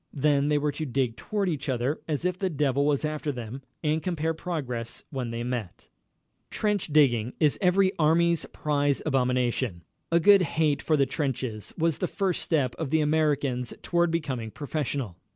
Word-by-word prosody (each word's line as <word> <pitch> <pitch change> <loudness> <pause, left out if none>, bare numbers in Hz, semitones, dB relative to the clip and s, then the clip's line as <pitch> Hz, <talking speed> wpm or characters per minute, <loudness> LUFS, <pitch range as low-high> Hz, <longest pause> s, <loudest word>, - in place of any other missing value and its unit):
Then 145 0 +2
they 150 - +3
were 145 0 0
to 155 +2 -4
dig 125 -2 0
toward 200 - -2
each 155 -4 -2
other 130 +4 -1
as 155 +1 -2
if 180 0 0
the 190 - 0
devil 140 -2 +1
was 145 0 +1
after 155 -1 -2
them, 125 0 -7 0.2
and 155 +1 +1
compare 165 -3 -1
progress 130 -9 -4
when 130 -4 -3
they 115 0 -3
met. 120 -7 -5 0.6
Trench 210 -3 0
digging 130 -7 +3
is 150 -2 +2
every 185 0 +4
army's 165 +2 +3
prize 145 -2 0
abomination. 125 - 0 0.3
A 170 - +5
good 200 +2 +7
hate 160 -4 +1
for 155 - +2
the 140 - +4
trenches 130 -6 -3
was 165 -2 +1
the 180 - 0
first 190 -2 -1
step 140 -7 +1
of 160 -4 -2
the 160 +2 +2
Americans 145 -5 0
toward 175 -1 +2
becoming 135 -9 -2
professional. 140 - -3
145 Hz, 170 wpm, -27 LUFS, 125-160 Hz, 0.6 s, good